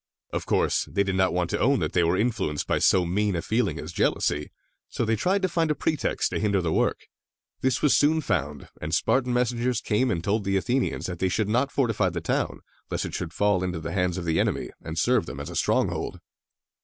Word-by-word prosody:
Of - - -3
course, - - +2
they 100 - +2
did 95 -1 -2
not 95 0 +2
want 90 -1 -1
to - - -1
own 140 +2 +3
that - - -2
they 90 - +3
were 85 +2 +2
influenced 105 -10 -1
by - - 0
so 90 -2 +4
mean 100 +3 0
a 85 - -1
feeling 110 -2 0
as - - -7
jealousy, 75 0 0 0.4
so 120 - -2
they 110 0 +2
tried 190 - +1
to - - +4
find 165 -2 0
a 150 - +1
pretext 155 -2 -1
to - - -1
hinder 100 -2 +1
the 85 -3 -1
work. - - +1 0.6
This 130 -2 0
was 150 - +5
soon 155 +2 +4
found, 75 - -2
and 80 +2 -1
Spartan 125 +5 +1
messengers 125 0 +1
came 120 +3 +1
and 85 -2 -1
told 105 +2 0
the 95 0 +1
Athenians 120 +8 -1
that 90 -2 -5
they 95 - +1
should 105 +2 0
not 125 +5 +1
fortify 115 -8 +1
the 85 0 -4
town, 85 - -2 0.3
lest - - -2
it - - -6
should 85 -2 -4
fall 105 0 +2
again 90 0 -1
into 90 -2 -4
the 80 +1 -5
hands 90 -1 0
of 90 - -4
the 80 -1 +1
enemy, - - -1
and 80 0 -6
serve 120 +4 +2
them 65 +2 -6
as 70 - -6
a - - -8
stronghold. - - 0
100 Hz, 235 wpm, -26 LUFS, 90-125 Hz, 0.6 s, was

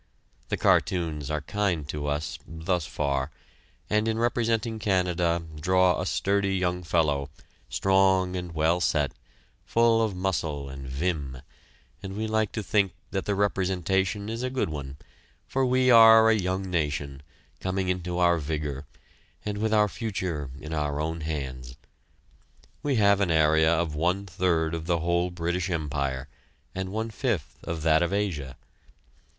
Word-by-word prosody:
The - - 0
cartoons 80 -6 +1
are 75 -1 -1
kind 90 -3 -1
to 75 -1 -3
us 75 +2 -2
thus 80 +1 -2
far 70 -2 -1 0.6
and 105 +1 +1
in 110 0 0
representing 115 -1 0
Canada, 90 -4 +1 0.2
draw 90 +1 +3
a - - -2
sturdy 100 0 +1
young 90 -1 0
fellow, 75 -5 +1 0.4
strong 95 -1 +3
and 90 -2 -5
well 80 +3 +2
set, 75 -5 +1 0.5
full 115 -1 +3
of 110 -4 0
muscle 80 -7 -2
and 65 0 -8
vim, 70 -2 -3 0.6
and 95 +1 -6
we 110 - -1
like 110 -1 0
to 110 - -3
think 100 -3 +1 0.2
that 95 - -2
the 100 - 0
representation 95 0 0
is 115 +2 -4
a 130 - -1
good 130 -8 -1
one, 70 -3 -6 0.5
for 135 -1 +1
we 130 0 +3
are 115 -1 +8
a - - +4
young 95 -1 -2
nation, 75 -4 -2 0.4
coming 95 0 -2
into 90 -1 -2
our 85 -1 +3
vigor, 75 -2 -4 0.6
and 105 -1 -3
with 110 0 0
our 105 -1 +4
future 95 - -3
in 75 +2 -7
our 75 -1 -1
own 80 +1 -2
hands. 65 -5 -5 1.1
We 145 -2 0
have 100 -2 +4
an 95 - +2
area 80 0 +4
of 85 -2 0
one 90 +6 0
third 85 -3 0
of 80 0 -4
the 85 -2 +1
whole 85 +1 +1
British 85 +1 -2
Empire, 70 -5 -2 0.5
and 95 0 -3
one 110 +2 -3
fifth 110 - -2
of 80 -2 -4
that 80 0 +4
of 85 - +1
Asia. 80 -11 -2
90 Hz, 155 wpm, -27 LUFS, 75-100 Hz, 1.1 s, are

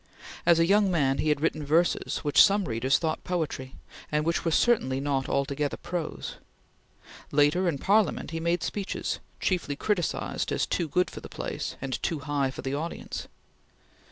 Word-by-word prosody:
As 170 -1 +7
a 165 - +4
young 200 +2 +4
man 140 -7 +1
he 155 - +1
had 150 -1 +1
written 155 -1 0
verses, 160 +4 +1
which 145 -1 +5
some 200 -1 +3
readers 120 +3 +2
thought 160 -2 -2
poetry, 155 -7 -3 0.4
and 150 0 +1
which 170 +1 0
were 165 - +1
certainly 155 - +2
not 135 -1 -1
altogether 140 +1 -1
prose. 175 -3 -5 0.9
Later, 150 +6 +3
in 150 - -2
Parliament 200 +5 +2
he 165 - -3
made 170 +1 0
speeches, 200 -1 -3 0.2
chiefly 175 -6 0
criticised 180 +1 -1
as - - +1
too 170 - -1
good 180 +5 +1
for - - -8
the - - -10
place - - -4
and 135 -1 -3
too 165 - -1
high 140 -2 0
for 130 - -8
the 135 - -2
audience. 160 +4 -4
155 Hz, 170 wpm, -27 LUFS, 140-175 Hz, 0.9 s, As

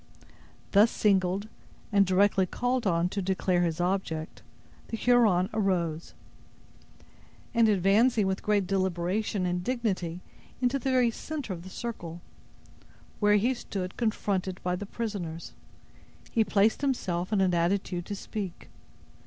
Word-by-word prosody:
Thus 210 +3 +6
singled, 195 -1 +1 0.5
and 200 -1 +5
directly 190 0 +3
called 245 +2 -1
on 170 -1 +2
to 200 - -3
declare 185 -1 +1
his 170 -2 0
object, 175 -3 -2 0.5
the 225 - -4
Huron 220 -7 +4
arose; 175 -6 -1 1.4
and 230 -2 +4
advancing 210 +3 +3
with 190 0 -1
great 205 -2 +1
deliberation 190 +2 -1
and 180 0 -1
dignity 185 -8 -2 0.4
into 250 +2 +1
the 265 - -2
very 250 -2 +3
center 290 -4 -5
of 170 - -7
the 185 - -10
circle, 175 -7 -6 1.0
where 210 -1 +4
he 230 +6 +2
stood 195 -6 -5
confronted 195 -5 -1
by 180 0 0
the 200 +2 -6
prisoners, 195 -8 -5 0.8
he 225 - +3
placed 210 +3 +2
himself 185 -10 -1
in 210 - +2
an 185 -2 +2
attitude 175 0 0
to 205 - -3
speak. 195 -3 -6
195 Hz, 130 wpm, -28 LUFS, 180-220 Hz, 1.4 s, Thus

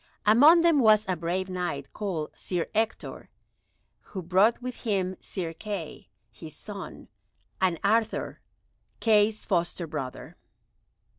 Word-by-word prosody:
Among 290 +11 +7
them 335 -3 +4
was 215 -3 +5
a 185 - 0
brave 175 +3 -2
Knight 175 -7 -4
called 180 -8 -3
Sir 175 -3 -3
Ector, 220 +1 -2 0.7
who 190 -3 -8
brought 190 +7 +3
with 250 0 -6
him 190 -5 -1
Sir 170 -3 -5
Kay, 180 - -7 0.2
his 155 +7 -10
son, 200 -3 -9 0.5
and 180 -4 +2
Arthur, 220 +2 0 0.6
Kay's 215 -1 +3
foster 175 -2 -1
brother. 150 -5 -7
190 Hz, 120 wpm, -27 LUFS, 170-220 Hz, 0.7 s, Among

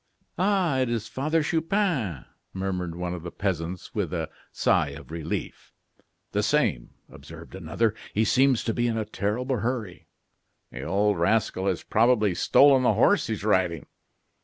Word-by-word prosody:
"Ah! 185 -7 +2
it 130 -2 +1
is 115 -2 -2
Father 155 +4 0
Chupin," 160 - -1 0.3
murmured 90 -3 -3
one 90 0 -3
of 90 - -6
the 85 - -6
peasants 90 -1 -4
with - - -2
a - - -3 0.2
sigh - - +2
of - - -13
relief. 80 -2 -5 0.6
"The - - +1
same," - - 0
observed 80 0 -12
another. 95 +5 -1 0.2
"He 110 +2 +1
seems 130 +1 +3
to 115 - -1
be 120 +1 0
in 115 -1 -1
a 110 - -1
terrible 115 +5 -2
hurry." 115 -6 -4 0.6
"The 70 - -7
old 100 +5 +1
rascal 95 +1 +1
has 95 -3 -1
probably 110 -3 +3
stolen 135 +8 +5
the 120 -3 +3
horse 195 - +3
he 110 - -1
is 105 - -6
riding." 90 -6 +1
105 Hz, 160 wpm, -26 LUFS, 90-130 Hz, 0.6 s, stolen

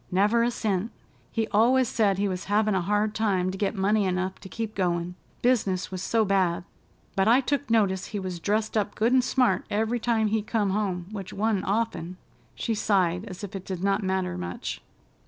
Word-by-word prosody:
"Never 205 +5 +3
a 240 - +2
cent! 210 -3 -1 0.4
He 225 -1 0
always 240 +5 +4
said 205 -4 +2
he 200 +1 +1
was 185 -1 -3
havin' 210 +1 +2
a 190 - +1
hard 210 +3 +1
time 190 -4 +1
to 190 - -6
get 205 +1 0
money 205 +1 +2
enough 185 0 -1
to 190 - -11
keep 225 0 -4
goin', 175 -2 -1 0.3
business 205 -8 +1
was 185 -1 -4
so 220 +3 +2
bad, 185 -4 +1 0.5
but 195 +1 +2
I 245 +4 +5
look 285 -2 0
notice 195 -5 +2
he 210 - -5
was 185 -3 -4
dressed 215 +5 -1
up 205 -1 0
good 230 +3 +2
and 260 -1 +5
smart 245 -7 +2
every 225 +3 0
time 225 -2 +1
he 220 +1 +1
come 210 -2 0
home, 190 -4 -1
which 195 -3 -6
wa'n't 205 -1 0
often." 190 -5 -1 0.4
She 230 - -1
sighed 190 -3 +1
as 185 -1 -9
if 200 0 -6
it 190 - -5
did 185 -2 -5
not 200 +1 +2
matter 190 - -1
much. 90 0 -5
205 Hz, 200 wpm, -26 LUFS, 185-220 Hz, 0.5 s, I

